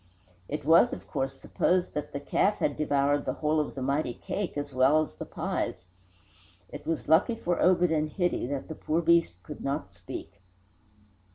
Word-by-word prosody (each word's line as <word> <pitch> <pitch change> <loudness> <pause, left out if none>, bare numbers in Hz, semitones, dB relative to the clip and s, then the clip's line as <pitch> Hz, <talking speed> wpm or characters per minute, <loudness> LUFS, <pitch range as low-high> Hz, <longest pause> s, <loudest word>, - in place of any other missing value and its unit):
It 150 -1 -4
was, 165 +2 +6
of 95 +2 -8
course, 135 +6 -3
supposed 180 0 0
that 150 - -4
the 140 - -4
calf 195 +8 +1
had 145 - 0
devoured 145 -1 +1
the 130 - -1
whole 155 +1 +1
of 150 - -2
the 135 - -4
mighty 140 -2 0
cake 195 -7 -4
as 145 -1 -4
well 130 +4 +5
as 150 - -9
the 95 - -8
pies. 90 - -3 0.8
It - - -9
was 165 -2 -2
lucky 165 - +4
for 175 -5 -1
Obed 180 -2 +4
and 155 -1 +1
Hitty 175 -6 -1
that 140 0 -4
the 160 - -5
poor 160 +2 -1
beast 170 - +4
could 150 - -9
not 100 -9 -3
speak. 90 +1 -9
150 Hz, 185 wpm, -28 LUFS, 135-165 Hz, 0.8 s, was